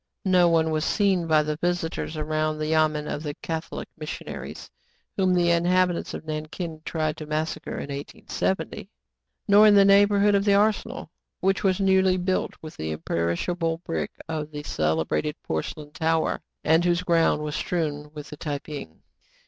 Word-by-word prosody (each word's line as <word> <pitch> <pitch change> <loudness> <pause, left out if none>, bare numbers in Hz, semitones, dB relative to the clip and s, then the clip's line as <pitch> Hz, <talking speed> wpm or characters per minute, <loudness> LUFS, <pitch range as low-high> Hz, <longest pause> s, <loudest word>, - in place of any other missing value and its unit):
No 180 -2 +5
one 160 -1 +2
was 155 -1 0
seen 190 -3 +2
by 155 -1 +4
the 150 0 -2
visitors 170 -2 -2
around 155 0 -1
the 155 - -2
yamen 155 -1 +2
of 145 - -3
the 145 -2 -4
Cath 160 0 -3
olic - - -5
missionaries, 155 -1 -7 0.4
whom 190 -2 +2
the 175 -1 +3
inhabitants 175 +1 +2
of - - -8
Nankin 155 +1 -5
tried 155 -1 -1
to 155 - -7
massacre 155 +1 -3
in 140 - -5
1870, 190 +7 -3 0.6
nor 205 +1 +7
in 210 - +7
the 200 -1 +7
neighborhood 200 +1 +5
of 200 0 +3
the 200 -1 +4
arsenal, 210 +1 0 0.3
which 195 +1 +1
was 190 -1 +2
newly 190 -1 +4
built 185 +1 -1
with 155 - -9
the 80 - -4
imperishable 85 - -1
brick 165 - -2 0.2
of 155 -2 -3
the 150 -1 -7
celebrated 80 - 0
porcelain 145 - -4
tower, 160 +1 0 0.2
and 160 +2 +4
whose 175 0 +2
ground 165 -3 +2
was 150 -1 -3
strewn 150 -4 -2
with 150 -1 -9
the 150 - -8
Tai 145 -1 -3
ping. 140 - -9
160 Hz, 165 wpm, -25 LUFS, 150-185 Hz, 0.6 s, nor